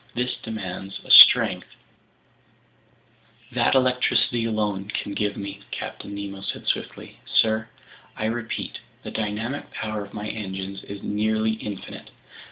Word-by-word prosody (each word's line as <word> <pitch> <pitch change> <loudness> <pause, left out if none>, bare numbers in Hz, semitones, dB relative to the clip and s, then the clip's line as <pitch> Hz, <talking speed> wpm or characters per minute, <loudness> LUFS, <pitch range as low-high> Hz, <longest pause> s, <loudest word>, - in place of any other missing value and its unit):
This 125 +1 -1
demands 95 -3 -6
a - - -3
strength—" - - +9 1.8
"That 120 +2 +2
electricity 125 -2 +2
alone 105 -3 -1
can 100 - -3
give 105 0 -1
me," 100 0 -6
Captain 100 - -6
Nemo 100 -1 -6
said - - -5
swiftly. - - -3
"Sir, 110 0 +2 0.5
I 110 - -2
repeat: 115 0 -3 0.2
the - - -6
dynamic 110 +6 -3
power 110 -1 -4
of 100 - -12
my 105 0 -4
engines 95 -2 -5
is 100 0 -8
nearly 110 +1 +1
infinite. 105 -3 -7
105 Hz, 125 wpm, -24 LUFS, 100-110 Hz, 1.8 s, strength